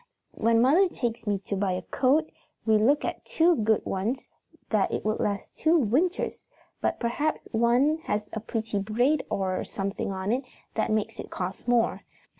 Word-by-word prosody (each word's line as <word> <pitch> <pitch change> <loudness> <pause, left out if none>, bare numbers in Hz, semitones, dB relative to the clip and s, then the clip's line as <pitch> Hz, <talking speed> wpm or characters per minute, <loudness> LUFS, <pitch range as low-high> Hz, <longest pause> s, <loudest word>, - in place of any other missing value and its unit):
When 230 +1 +3
mother 345 +9 +5
takes 235 -6 -3
me 205 -1 +2
to 200 - -2
buy 195 -1 0
a 180 0 -3
coat, 285 - +2 0.4
we 220 -1 +4
look 275 +7 +3
at - - -4
two 335 +1 +3
good 220 -1 +2
ones 215 +8 -2 0.4
that 210 -3 +3 0.2
will 215 0 +1
last 200 -1 -2
two 325 +2 +3
winters, 305 - 0 0.3
but - - 0
perhaps 290 +6 -1
one 245 +7 +3
has 210 0 -1 0.2
pretty 225 -3 -2
braid 245 +9 +1
or 190 -1 -1
something 195 0 -3
on 190 +2 -2
it, 255 +3 0 0.3
that 220 - 0
makes 215 -1 -1
it - - -6
cost 185 +4 -5
more. 240 -1 +2
225 Hz, 165 wpm, -27 LUFS, 205-270 Hz, 0.4 s, mother